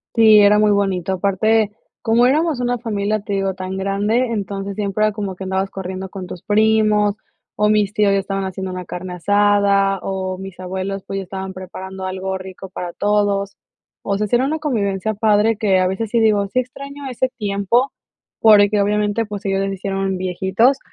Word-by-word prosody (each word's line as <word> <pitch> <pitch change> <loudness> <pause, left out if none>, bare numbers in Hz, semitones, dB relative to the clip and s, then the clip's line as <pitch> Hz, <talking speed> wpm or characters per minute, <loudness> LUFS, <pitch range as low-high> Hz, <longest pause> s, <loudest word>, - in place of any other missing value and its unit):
Sí, 220 -2 +7
era 205 +1 +5
muy 210 0 +4
bonito. 195 -3 +1
Aparte, 205 +3 +2 0.3
como 235 +2 +4
éramos 305 0 +1
una 245 0 0
familia, 215 -2 -2
te 205 -1 -5
digo, 195 -1 -1
tan 185 0 -5
grande, 205 +6 0
entonces, 200 -2 -4
siempre 210 +1 0
era 215 - +2
como 200 -3 -4
que 190 - -8
andabas 190 +1 -1
corriendo 190 0 -6
con 190 -2 -7
tus 180 - -9
primos, 215 -1 +3 0.4
o 210 0 +2
mis 210 -1 +2
tíos 210 -3 +3
ya 195 - +3
estaban 195 0 -3
haciendo 190 0 -5
una 180 -1 -6
carne 180 +1 -6
asada, 200 +1 +2
o 190 -1 -3
mis 190 -1 -9
abuelos, 190 +1 -4
pues, 195 - -3
ya 195 - -3
estaban 190 +1 -6
preparando 185 +1 -8
algo 190 0 -3
rico 190 0 -9
para 175 -1 -6
todos. 205 -1 0 0.5
O 200 - -1
sea, 210 - 0
sí 240 - +2
era 255 +2 +2
una 310 +3 -1
convivencia 215 - -1
padre 210 +1 +3
que 195 -3 +2
a 185 - +2
veces 200 +3 -3
sí 235 - +2
digo, 210 -2 +3
sí 255 +6 0
extraño 275 +2 -7
ese 255 +1 -1
tiempo 205 +5 +1 0.5
porque 205 -1 +5
obviamente, 210 +2 +1
pues, 205 -1 -7
ellos 195 0 0
ya 195 - -1
se 195 - -3
hicieron 195 0 -2
viejitos 190 +8 +1
200 Hz, 190 wpm, -19 LUFS, 190-215 Hz, 0.5 s, Sí